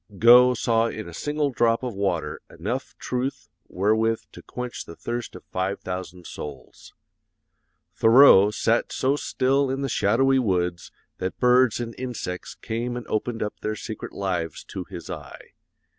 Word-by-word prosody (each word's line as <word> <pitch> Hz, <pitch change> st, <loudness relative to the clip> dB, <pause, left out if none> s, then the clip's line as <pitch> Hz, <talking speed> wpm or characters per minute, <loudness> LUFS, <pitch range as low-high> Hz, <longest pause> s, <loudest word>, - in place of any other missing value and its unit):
Gough 125 Hz, +3 st, +7 dB
saw 115 Hz, 0 st, +2 dB
in 110 Hz, -3 st, -6 dB
a 85 Hz, -, -9 dB
single 150 Hz, -, -1 dB
drop 115 Hz, -1 st, +2 dB
of 125 Hz, -2 st, -3 dB
water 85 Hz, -6 st, -2 dB
enough -, -, -5 dB
truth 125 Hz, -3 st, -3 dB, 0.2 s
wherewith 110 Hz, +3 st, +1 dB
to -, -, -12 dB
quench 125 Hz, -1 st, -6 dB
the 85 Hz, -, -10 dB
thirst 120 Hz, +4 st, -5 dB
of -, -, -10 dB
five 95 Hz, +2 st, -3 dB
thousand 90 Hz, -1 st, -6 dB
souls. 75 Hz, -1 st, -10 dB, 1.0 s
Thoreau 115 Hz, -4 st, +7 dB
sat 115 Hz, +2 st, 0 dB
so 135 Hz, +2 st, +1 dB
still 135 Hz, -1 st, +1 dB
in 135 Hz, +1 st, -2 dB
the 135 Hz, -, -1 dB
shadowy 130 Hz, +6 st, +3 dB
woods 90 Hz, -6 st, -1 dB, 0.3 s
that 95 Hz, -, -4 dB
birds 125 Hz, -1 st, +4 dB
and 115 Hz, -1 st, -4 dB
insects 120 Hz, -8 st, -5 dB
came 120 Hz, +2 st, -4 dB
and 120 Hz, -, -6 dB
opened 115 Hz, +2 st, -1 dB
up 105 Hz, -, -5 dB
their 110 Hz, 0 st, -3 dB
secret 110 Hz, 0 st, -7 dB
lives 90 Hz, -5 st, -3 dB
to -, -, -7 dB
his -, -, -9 dB
eye. -, -, -9 dB
115 Hz, 155 wpm, -24 LUFS, 95-125 Hz, 1.0 s, Gough